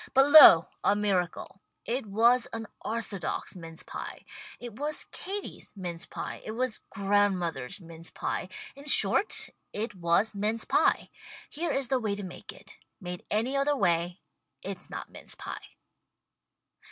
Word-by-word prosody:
But 270 +2 +6
lo, 180 - +10 0.2
a 200 - +3
miracle. 195 -2 -2 0.2
It 245 -1 -2
was 230 +4 +3
an 225 0 -4 0.2
orthodox 215 -7 -4
mince 165 -2 -9
pie. - - -8 0.3
It 240 -2 -8
was 300 +1 -2
Katie's 395 +1 -6
mince 175 -3 -6
pie. - - -6
It 215 - -6
was 250 -1 -1
grandmother's 195 -8 0
mince 165 -2 -8
pie 180 - -4
— - - -13
in 280 +1 -13
short, 395 +7 +5 0.2
it 210 +1 -4
was 180 +4 +1
mince 215 +3 -1
pie. - - +2 0.4
Here 335 +3 -2
is 270 -3 0
the 265 - +2
way 215 -4 -1
to 205 - -7
make 180 -2 -9
it. - - -14 0.2
Made 180 -3 -7
any 230 +6 0
other 280 +1 +2
way 175 -2 0 0.4
it's - - -7
not - - -7
mince - - -6
pie. - - -9
210 Hz, 150 wpm, -28 LUFS, 180-250 Hz, 0.4 s, lo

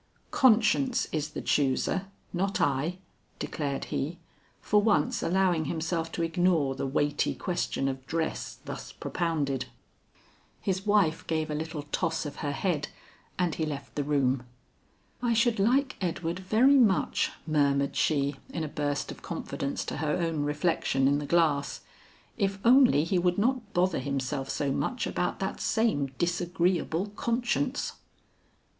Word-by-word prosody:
"Conscience 245 +1 +4
is 155 -1 -1
the - - -5
chooser, 145 +7 +1 0.3
not 195 +2 0
I," 145 +6 +1 0.4
declared 140 -3 -3
he, 155 +6 -2 0.4
for 210 0 +3
once 205 -9 +2
allowing 180 -3 +2
himself 165 +1 -2
to 170 - -1
ignore 165 -4 +2
the 135 - -3
weighty 145 +2 0
question 175 -6 -1
of 135 0 -4
dress 160 +1 -2
thus - - -7
propounded. 145 -6 -2 0.9
His 190 +1 -2
wife 195 -6 +2
gave 155 -1 -1
a - - -1
little 155 0 -4
toss 165 -2 0
of 145 - -6
her 145 - -2
head 150 -1 -1 0.5
and 175 -3 +1
he 160 - -2
left 145 -3 -5
the 145 - -1
room. 135 -3 +1 0.8
"I 240 -1 +2
should 230 -1 +2
like 260 +7 +2
Edward 170 -1 -2
very 235 +9 +4
much," 205 -7 +3 0.2
murmured 140 -3 +2
she 140 -2 +1
in 165 - -3
a - - -2
burst 145 -1 -2
of - - -10
confidence 140 0 -4
to - - -4
her 150 0 0
own 165 -3 -1
reflection 145 -2 +1
in 140 +1 +3
the 145 - -5
glass, 155 -4 +2 0.6
"if 195 -1 +1
only 245 - +6
he 175 +2 +1
would 175 0 +1
not 230 0 0
bother 180 -1 +2
himself 135 0 -2
so 140 -2 -1
much 250 - -1
about - - -1
that - - -3
same 220 -12 +1
disagreeable 175 +1 0
conscience." 245 +4 -1
165 Hz, 145 wpm, -28 LUFS, 145-195 Hz, 0.9 s, only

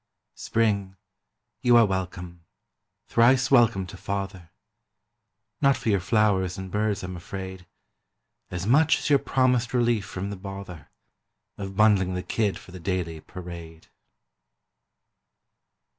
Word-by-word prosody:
Spring, 100 -4 0 0.7
you 120 -1 +5
are 115 - +7
welcome, 90 -3 -4 0.6
thrice 130 +3 +3
welcome 115 -7 +4
to 90 - -10
father; 95 -2 -5 1.1
Not 140 -3 +4
for - - -2
your 100 -2 +3
flowers 95 -2 +1
and 95 -1 -7
birds, 105 -1 -1
I'm 90 0 -5
afraid, 95 +1 -7 0.8
As 90 0 -4
much 150 +8 +4
as - - -3
your 140 - +6
promised 125 -3 +1
relief 120 -3 +2
from 95 +1 -5
the - - -4
bother 95 -4 -9 0.7
Of 95 -1 -7
bundling 100 -4 +4
the 90 - -3
kid 105 -2 -1
for - - -14
the 90 - -9
daily 85 -2 -3
parade. 85 -2 -10
95 Hz, 125 wpm, -26 LUFS, 90-115 Hz, 1.1 s, are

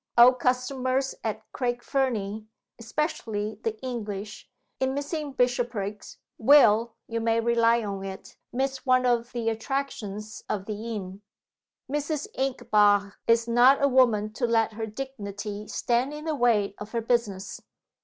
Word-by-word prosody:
Old 250 +1 +8
customers 255 +1 0
at 220 -1 -3
Craig 240 -2 -2
Fernie 220 -6 -1 0.3
(especially 220 -5 -3
the 220 -1 -2
English), 210 -5 -5 0.3
in 265 0 0
missing 290 +1 -3
Bishopriggs, 245 -5 -1 0.2
will, 230 -3 +5
you 230 0 -2
may 225 0 +2
rely 230 0 +3
on 200 -2 -4
it, 195 0 -8 0.2
miss 265 +1 -2
one 255 -1 +3
of 240 -1 +1
the 235 -2 -3
attractions 220 -3 -4
of 195 -2 -2
the 220 +2 -4
inn. 190 -1 -7 0.7
Mrs. 295 +2 -2
Inchbare 205 -6 +2
is 230 0 +3
not 245 +4 +5
a - - +6
woman 230 -5 +3
to 240 +2 -1
let 225 -1 +2
her 220 +1 -4
dignity 210 -4 -6
stand 250 +5 0
in 300 +1 -8
the 320 - 0
way 230 -7 +2
of 210 +2 -8
her 230 - 0
business. 220 -5 -1
235 Hz, 140 wpm, -26 LUFS, 210-260 Hz, 0.7 s, Old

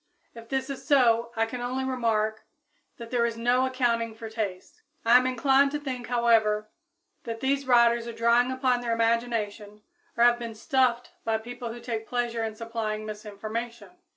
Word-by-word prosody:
If 230 -1 -12
this 265 +1 -2
is 275 - -7
so, 235 -4 +4
I 225 0 +2
can 245 +2 -6
only 255 +2 -2
remark 225 -4 -1 0.5
that 230 -1 -9
there 245 -2 +2
is 230 -1 -1
no 245 +3 +2
accounting 235 -3 0
for 220 0 -8
tastes. 215 - -5 0.2
I 230 +1 +6
am 255 +1 +6
inclined 270 +2 +3
to 295 - -1
think, 260 -4 -5
however, 220 -3 +2 0.5
that 230 -1 -5
these 275 +1 0
writers 235 -1 +4
are - - -4
drawing 235 +2 +3
upon 255 -1 +1
their 235 -1 -1
imagination 225 -3 -1 0.3
or 235 - +4
have 240 0 +5
been 230 -2 -6
"stuffed" 245 +1 +1
by 225 -1 +1
people 240 +1 -7
who 240 - -8
take 225 -2 -5
pleasure 240 -2 -1
in 220 -1 -4
supplying 220 -1 -4
misinformation. 215 +1 -6
235 Hz, 175 wpm, -27 LUFS, 225-245 Hz, 0.5 s, I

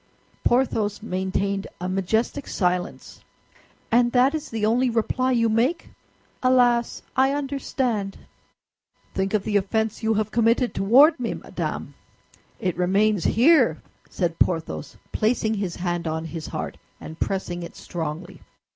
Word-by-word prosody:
Porthos 225 -5 +1
maintained 195 0 -2
a 180 - -3
majestic 220 +9 -1
silence. 180 -2 -2 0.7
"And 240 +1 +4
that 255 +3 +4
is 310 -1 -4
the 220 -2 -1
only 245 +4 +2
reply 250 +3 0
you 230 -2 +3
make? 240 +10 0 0.5
Alas, 245 -2 +3
I 265 +1 +3
understand." 265 -7 -2 1.0
"Think 195 +2 0
of 205 - 0
the 210 -2 +1
offense 220 +2 -1
you 220 0 +1
have 215 0 -1
committed 235 +2 +2
toward 270 +10 +5
me, 240 - -2
madame! - - -5 0.7
It 185 -6 -1
remains 195 +1 +2
here!" 245 - +4 0.3
said 170 -3 -2
Porthos, 165 -4 -1
placing 220 0 +1
his 195 -5 -3
hand 175 -2 -2
on 160 +1 -2
his 165 -1 -6
heart, - - -5 0.2
and 160 +1 -10
pressing 180 -2 -2
it 170 - -8
strongly. 170 +2 -6
215 Hz, 130 wpm, -24 LUFS, 185-245 Hz, 1.0 s, toward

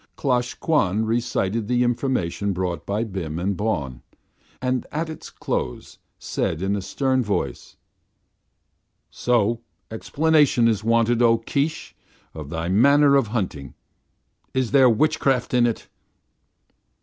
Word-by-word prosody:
Klosh 125 -3 0
Kwan 110 - +1
recited 115 -2 -1
the 125 +1 +2
information 115 -6 -1
brought 90 -2 -3
by 105 +3 -1
Bim 90 -8 -5
and 95 +3 -1
Bawn, 75 - -3 0.6
and 125 0 -1
at 160 +1 -3
its 155 - -9
close - - -4 0.2
said 80 - -2
in 100 +1 0
a 100 - -3
stern 130 +7 0
voice: 105 -2 -3 1.4
"So 115 -1 +1 0.3
explanation 145 0 +2
is 110 -3 0
wanted, 115 +1 +2
O 115 -1 +5
Keesh, 140 +7 -3 0.4
of 75 -3 -8
thy 80 +1 -3
manner 140 +9 +5
of 135 -5 +3
hunting. 90 - -4 0.8
Is 130 -3 0
there 135 -3 +6
witchcraft 135 0 +1
in 120 -1 +4
it?" 115 - -4
115 Hz, 125 wpm, -23 LUFS, 100-130 Hz, 1.4 s, there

